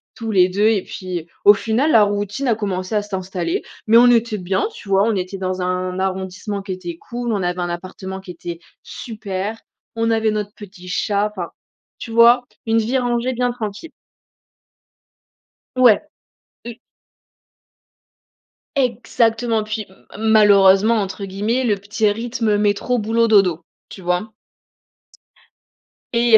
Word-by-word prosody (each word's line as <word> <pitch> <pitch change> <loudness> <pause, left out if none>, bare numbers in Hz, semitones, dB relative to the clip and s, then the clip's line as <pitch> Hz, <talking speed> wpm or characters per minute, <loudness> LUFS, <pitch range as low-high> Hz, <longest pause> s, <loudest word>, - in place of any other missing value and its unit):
tous 225 -2 -4
les 185 -2 +5
2 205 +3 +1
et 210 -4 +2
puis, 180 -3 -6 0.2
au 205 - +10
final, 230 +9 0
la 220 - +6
routine 205 +5 -2
a 230 - +3
commencé 195 -1 -3
à 210 - +2
s'installer, 185 -4 -3 0.2
mais 225 +1 +5
on 245 +1 +7
était 230 -2 +2
bien, 190 - -1
tu 205 - -12
vois? 195 +1 +4
On 225 -1 +1
était 185 +1 -3
dans 185 0 -3
un 185 0 -2
arrondissement 190 +2 -3
qui 195 -1 -7
était 175 -2 -6
cool, 240 +4 -4
on 195 -3 -1
avait 180 0 -2
un 175 - -2
appartement 190 +2 -6
qui 185 -2 -9
était 170 0 -7 0.2
super, 215 -2 -5 0.4
on 230 0 +1
avait 220 -1 +2
notre 210 0 -3
petit 190 -3 -12
chat, 205 +2 0
enfin, 175 -3 -4 0.5
tu 230 - -7
vois? 235 +2 +6 0.2
Une 225 0 +2
vie 235 +4 0
rangée 245 0 0
bien 245 0 0
tranquille. 230 +6 -6 1.8
Ouais. 250 -4 +6 0.7
Et 235 -1 -8 2.0
Exactement, 230 -3 +1
puis 215 0 -4 0.3
malheureusement 210 -1 +5
entre 195 +1 -5
guillemets, 210 +7 -1
le 210 -4 +2
petit 205 +2 -1
rythme 225 -1 -1
métro, 210 +4 +1
boulot, 225 +2 +1
dodo. 195 -6 +3 0.3
Tu 190 - -11
vois? 180 +5 -1 1.8
Et 235 -1 +6
210 Hz, 145 wpm, -20 LUFS, 190-230 Hz, 2.0 s, au